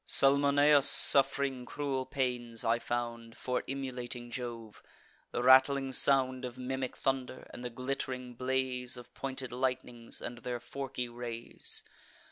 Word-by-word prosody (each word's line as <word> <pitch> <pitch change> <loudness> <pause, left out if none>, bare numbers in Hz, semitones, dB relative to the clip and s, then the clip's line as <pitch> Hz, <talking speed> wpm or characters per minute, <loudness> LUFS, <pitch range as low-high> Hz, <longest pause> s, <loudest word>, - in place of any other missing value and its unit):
Salmoneus, 140 +1 +5
suff'ring 135 -1 +6
cruel 135 -1 -3
pains, 125 -4 -2
I 115 +1 +2
found, 120 -1 -5
For 125 -1 -2
emulating 125 -3 -5
Jove; 115 -3 -7 0.5
the 120 - -3
rattling 130 +1 +5
sound 130 -1 +3
Of 125 -1 -6
mimic 130 0 -4
thunder, 130 -1 -3
and 120 - -9
the 125 - -4
glitt'ring 125 0 -5
blaze 130 0 -2
Of 125 0 -13
pointed 130 -2 -5
lightnings, 125 -2 -3
and 120 0 -6
their 120 0 -4
forky 135 0 -5
rays. 120 -1 -6
125 Hz, 125 wpm, -31 LUFS, 120-135 Hz, 0.5 s, suff'ring